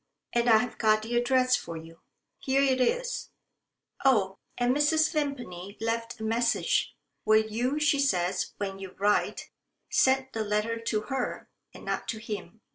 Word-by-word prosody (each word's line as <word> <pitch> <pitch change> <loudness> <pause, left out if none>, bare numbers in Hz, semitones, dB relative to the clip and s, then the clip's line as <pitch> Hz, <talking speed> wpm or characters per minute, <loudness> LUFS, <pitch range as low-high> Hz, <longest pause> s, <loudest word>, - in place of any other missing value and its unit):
And 240 0 +2
I've 225 +2 +3
got 215 -1 +3
the 235 +2 -3
address 255 +1 +3
for 165 -1 -5
you. 165 +1 -12 0.4
Here 270 0 +2
it 260 -2 +2
is. - - 0 0.7
Oh! 200 -8 +3 0.2
and 245 +1 +2
Mrs. 310 +2 +3
Vimpany 245 - -4
left 230 +1 -2
a - - -6
message. 235 - +1 0.3
Will 215 0 +4
you, 240 +6 -1
she 300 -1 +3
says, 185 -10 0
when 195 -1 -4
you 190 -1 -9
write, 205 +1 0 0.4
send 265 0 +3
the 220 - -1
letter 210 +2 -1
to 230 -2 -1
her 265 +2 -4 0.2
and - - -13
not - - -2
to 225 - -3
him? 220 0 -7
230 Hz, 155 wpm, -28 LUFS, 210-265 Hz, 0.7 s, Will